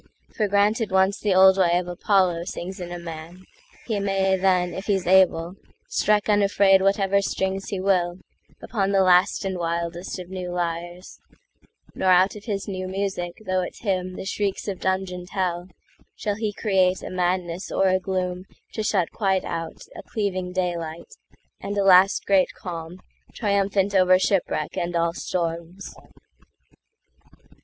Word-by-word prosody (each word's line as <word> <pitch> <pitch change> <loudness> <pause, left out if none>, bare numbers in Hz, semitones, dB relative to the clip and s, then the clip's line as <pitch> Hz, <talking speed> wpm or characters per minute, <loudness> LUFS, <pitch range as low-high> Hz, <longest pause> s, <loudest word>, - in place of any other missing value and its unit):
For 215 - +1
granted 205 +2 +2
once 190 +1 +2
the 200 -3 +1
old 190 +1 +6
way 175 -2 +4
of 180 - -2
ApolloSings 180 0 -1
in 175 0 -6
a 175 - -4
man, 170 +1 -9 0.4
he 220 -4 -1
may 195 -1 +1
then, 180 -2 +1
if 190 - -7
he's 195 -3 +1
able, 180 -2 +3 0.4
Strike 210 0 +1
unafraid 200 -2 +4
whatever 195 0 +2
strings 190 0 -2
he 195 - -3
willUpon 190 +2 -2
the 195 -1 +4
last 180 +1 +3
and 190 -2 -3
wildest 170 +2 -3
of 180 -1 -9
new 185 -1 -5
lyres; 175 +1 -4 0.7
Nor 190 - 0
out 185 +2 +4
of 210 - -11
his 200 -4 -3
new 185 -2 -4
magic, 190 -1 -4
though 185 0 0
it 180 - -6
hymnThe 185 -2 -2
shrieks 200 +1 -2
of 195 -3 -4
dungeoned 185 -1 -2
hell, 180 -2 -2 0.5
shall 205 - -2
he 215 -1 -2
createA 190 -3 0
madness 180 0 -2
or 195 - +2
a 185 0 +2
gloom 185 -1 -3 0.3
to 220 - -3
shut 195 -5 0
quite 190 -3 0
outA 165 -1 -6
cleaving 185 -4 -2
daylight, 170 - -4 0.5
and 205 +1 -5
a 200 - +2
last 195 +1 +5
great 195 -2 +3
calmTriumphant 195 +3 -3
over 185 -1 +5
shipwreck 185 -5 -1
and 175 0 -2
all 170 0 +1
storms. 170 +1 -4
185 Hz, 145 wpm, -24 LUFS, 175-195 Hz, 0.7 s, old